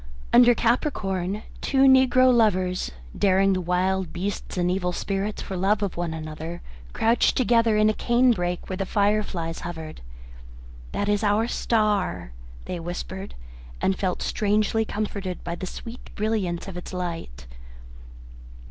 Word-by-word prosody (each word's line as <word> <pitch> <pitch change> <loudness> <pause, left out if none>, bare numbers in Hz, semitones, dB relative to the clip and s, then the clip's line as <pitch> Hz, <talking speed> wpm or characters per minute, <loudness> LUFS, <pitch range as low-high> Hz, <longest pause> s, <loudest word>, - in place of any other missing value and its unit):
Under 245 0 +7
Capricorn, 210 - 0 0.2
two 270 -1 +2
negro 260 -1 +6
lovers, 185 -6 +2 0.3
daring 195 0 +3
the 185 - -1
wild 180 0 0
beasts 190 +2 -4
and 180 0 +1
evil 180 -1 0
spirits 195 +3 -3
for 190 - -5
love 200 +3 +1
of 200 - -2
one 175 -1 -2
another, 160 +1 -6 0.3
crouched 230 - +2
together 230 -3 +3
in 215 0 +4
a 215 - +3
cane 245 +3 +3
brake 175 -4 -2
where 185 - -4
the 195 -1 -3
fire 205 +2 +2
flies 165 -5 -4
hovered. 160 - -7 0.9
"That 205 - -2
is 205 +1 +1
our 210 +2 +2
star," 205 - 0 0.3
they 180 - -4
whispered, 180 +3 -6 0.4
and 190 - +1
felt 185 -2 -2
strangely 215 +1 +1
comforted 200 -4 -4
by 170 - -4
the 185 +2 -5
sweet 230 +6 -9
brilliance 205 -6 -1
of 190 -2 -7
its 180 - -8
light. 165 - -5
195 Hz, 145 wpm, -25 LUFS, 180-215 Hz, 0.9 s, Under